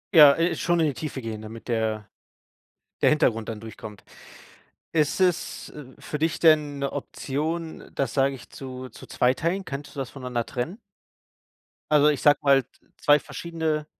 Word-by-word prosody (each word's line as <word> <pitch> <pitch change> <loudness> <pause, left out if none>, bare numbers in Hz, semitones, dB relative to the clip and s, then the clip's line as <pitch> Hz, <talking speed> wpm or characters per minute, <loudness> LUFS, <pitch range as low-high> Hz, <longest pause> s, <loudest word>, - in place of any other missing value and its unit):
Ja, 150 -3 +10
äh, 170 +1 +1
schon 175 0 +1
in 160 - +4
die 145 - 0
Tiefe 140 -1 -5
gehen, 110 -2 -5
damit 110 +1 -10
der 110 -3 -1 1.0
der - - +7
Hintergrund 115 -8 +2
dann 110 -2 -5
durchkommt. 110 -2 -10 0.9
Ist 155 +2 +1
es, 180 -3 0
äh, 150 -2 -10 0.2
für 150 - -5
dich 160 +1 0
denn 150 -3 +4
'ne 140 0 -2
Option, 160 +4 -4
das, 135 -4 -1
sage 135 0 +2
ich, 125 - -12
zu 130 -1 -8
zu 110 - -13
zweiteilen? 165 +10 +1
Könntest 140 -2 -7
du 140 - -4
das 130 - -4
voneinander 125 -3 -3
trennen? 155 - -4 1.1
Also, 150 -1 +6
ich 145 - 0
sage 145 -1 +5
mal, 140 -2 +5
z - - -32 0.2
2 145 0 +5
verschiedene 160 -3 -3
140 Hz, 165 wpm, -25 LUFS, 125-155 Hz, 1.1 s, Ja